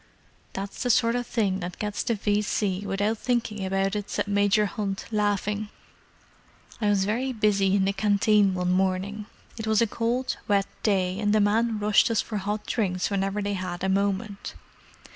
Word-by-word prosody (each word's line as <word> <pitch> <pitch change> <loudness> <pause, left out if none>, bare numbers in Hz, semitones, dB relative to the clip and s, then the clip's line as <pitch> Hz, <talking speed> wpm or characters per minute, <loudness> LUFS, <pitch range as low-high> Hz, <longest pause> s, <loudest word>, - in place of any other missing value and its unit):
"That's 195 +1 -6
the 250 - 0
sort 230 0 +3
that 200 -7 -1
gets 210 -1 -3
the 235 - 0
V.C. 205 -1 -1
without 205 +3 0
thinking 230 -5 -1
about 195 +1 0
it," 205 -1 -4
said - - -2
Major 205 +1 +3
Hunt, 195 0 -3
laughing. 210 0 0 1.1
"I 210 - +2
was 195 -2 +2
very 245 +6 -1
busy 205 -4 +2
in 195 -1 +2
the 195 - +1
Canteen 205 -1 +3
one 180 0 0
morning—it 195 +4 -3
was 220 -1 +3
a 230 - +4
cold, 235 +4 -1
wet 200 -1 +3 0.2
day, 190 -2 +1
and 210 -1 +1
the 215 - +4
men 220 +2 +2
rushed 210 +1 +3
us 230 - +1
for 215 - -2
hot 205 +2 -3
drinks 185 -5 -1
whenever 195 +1 -1
they 205 0 -1
had 185 -2 -4
a 190 - +1
moment. 200 +1 -1
205 Hz, 165 wpm, -26 LUFS, 195-215 Hz, 1.1 s, a